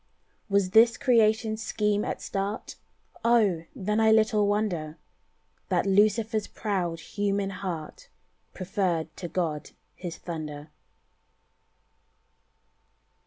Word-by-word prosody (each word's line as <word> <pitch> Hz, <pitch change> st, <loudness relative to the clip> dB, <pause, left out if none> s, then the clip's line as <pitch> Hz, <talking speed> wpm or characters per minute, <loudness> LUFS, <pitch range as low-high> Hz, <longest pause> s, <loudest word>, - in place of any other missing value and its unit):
Was 200 Hz, -2 st, +2 dB
this 230 Hz, +3 st, +6 dB
Creation's 220 Hz, -3 st, +2 dB
scheme 210 Hz, -1 st, 0 dB
at -, -, -4 dB
start? 200 Hz, +2 st, -3 dB, 0.5 s
Oh! 210 Hz, -8 st, +3 dB
then 210 Hz, -2 st, -1 dB
I 220 Hz, 0 st, +5 dB
little 215 Hz, -1 st, +3 dB
wonder 180 Hz, -7 st, -1 dB, 0.7 s
That -, -, +1 dB
Lucifer's 210 Hz, +2 st, +2 dB
proud 180 Hz, -6 st, -2 dB
human 200 Hz, +3 st, -2 dB
heart 185 Hz, -, -6 dB, 0.4 s
Preferred 180 Hz, -4 st, -2 dB
to 175 Hz, -, -5 dB
God 165 Hz, -3 st, -2 dB, 0.3 s
His 175 Hz, -2 st, -6 dB
thunder. 155 Hz, -3 st, -7 dB
200 Hz, 95 wpm, -27 LUFS, 175-215 Hz, 0.7 s, this